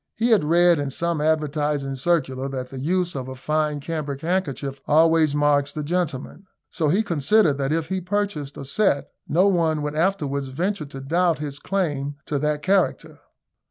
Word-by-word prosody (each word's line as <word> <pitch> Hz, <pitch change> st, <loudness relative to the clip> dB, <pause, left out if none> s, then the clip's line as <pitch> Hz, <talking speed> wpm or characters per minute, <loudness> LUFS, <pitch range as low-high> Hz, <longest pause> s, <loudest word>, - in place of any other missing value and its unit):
He 235 Hz, +1 st, +1 dB
had 215 Hz, -7 st, +5 dB
read 170 Hz, +1 st, +4 dB
in 145 Hz, -1 st, -2 dB
some 170 Hz, +3 st, -1 dB
advertising 150 Hz, -2 st, 0 dB
circular 135 Hz, -2 st, 0 dB
that 130 Hz, -2 st, -5 dB
the 135 Hz, -, -6 dB
use 175 Hz, +5 st, 0 dB
of 130 Hz, -2 st, -4 dB
a 130 Hz, -, -7 dB
fine 150 Hz, +2 st, -1 dB
cambric 145 Hz, -2 st, -4 dB
handkerchief 145 Hz, -6 st, -2 dB
always 160 Hz, -1 st, +4 dB
marks 145 Hz, -1 st, +2 dB
the 150 Hz, -, -4 dB
gentleman; 175 Hz, +2 st, -3 dB, 0.2 s
so 160 Hz, -, 0 dB
he 195 Hz, +8 st, +2 dB
considered 165 Hz, -2 st, +2 dB
that 135 Hz, +1 st, 0 dB
if 160 Hz, 0 st, -1 dB
he 190 Hz, 0 st, -1 dB
purchased 185 Hz, -7 st, -2 dB
a 140 Hz, -, -7 dB
set, 140 Hz, -1 st, +1 dB, 0.2 s
no 175 Hz, +6 st, +3 dB
one 165 Hz, -6 st, +2 dB
would 150 Hz, 0 st, -2 dB
afterwards 150 Hz, -5 st, 0 dB
venture 170 Hz, +5 st, -2 dB
to 135 Hz, -1 st, -9 dB
doubt 170 Hz, +4 st, +1 dB
his 145 Hz, -1 st, -5 dB
claim 145 Hz, -7 st, -2 dB
to 145 Hz, -, -1 dB
that 150 Hz, 0 st, -1 dB
character. 170 Hz, -5 st, 0 dB
150 Hz, 175 wpm, -23 LUFS, 140-175 Hz, 0.2 s, had